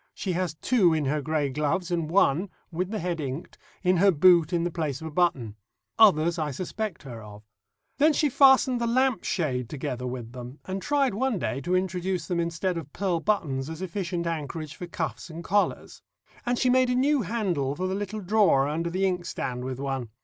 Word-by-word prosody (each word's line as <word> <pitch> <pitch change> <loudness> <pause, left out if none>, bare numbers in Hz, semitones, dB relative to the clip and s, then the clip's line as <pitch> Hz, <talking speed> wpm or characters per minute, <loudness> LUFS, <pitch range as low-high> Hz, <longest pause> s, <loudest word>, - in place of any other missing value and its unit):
She 190 - -3
has 180 -2 -2
two 180 -3 +3
in 155 -2 0
her 150 +2 0
grey 150 -1 0
gloves, 150 +6 -1
and 165 -3 -1
one 185 0 +3 0.2
(with 180 +2 -2
the 215 - -3
head 175 -3 -2
inked) 140 +3 -6 0.2
in 180 0 +3
her 200 +3 +5
boot 175 -1 +5
in 170 -2 +1
the 175 - -1
place 155 -6 -3
of 160 - -8
a 160 - -5
button. 145 - 0 0.4
Others 170 -6 +5
I 155 -1 -1
suspect 185 +6 -4
her 120 -5 -8
of. 105 0 -12 0.6
Then 305 +3 +6
she 300 0 +2
fastened 265 -2 +5
the 235 - +1
lamp 255 -3 +2
shade 125 - -1
together 125 -3 -4
with 125 -2 -6
them, 125 +2 -9
and 190 +1 -4
tried 280 -2 +1
one 250 +1 0
day 120 -3 -2
to 180 +6 0
introduce 185 -1 -1
them 175 -1 -1
instead 170 +1 -1
of 150 -3 -10
pearl 185 -3 0
buttons 155 -8 -1
as 160 0 -6
efficient 175 -2 -3
anchorage 155 -2 -4
for 180 - -7
cuffs 170 0 -4
and 165 +1 -8
collars. 205 +4 -1 0.5
And 245 0 +1
she 250 0 +2
made 255 0 +4
a 250 - +1
new 280 +2 +3
handle 175 - -1
for 185 - -3
the 185 - -1
little 205 +2 -4
drawer 195 -8 +3
under 165 +3 -2
the 185 +3 0
inkstand 175 -9 -2
with 130 0 -5
one. 135 -4 -3
170 Hz, 205 wpm, -26 LUFS, 145-195 Hz, 0.6 s, Then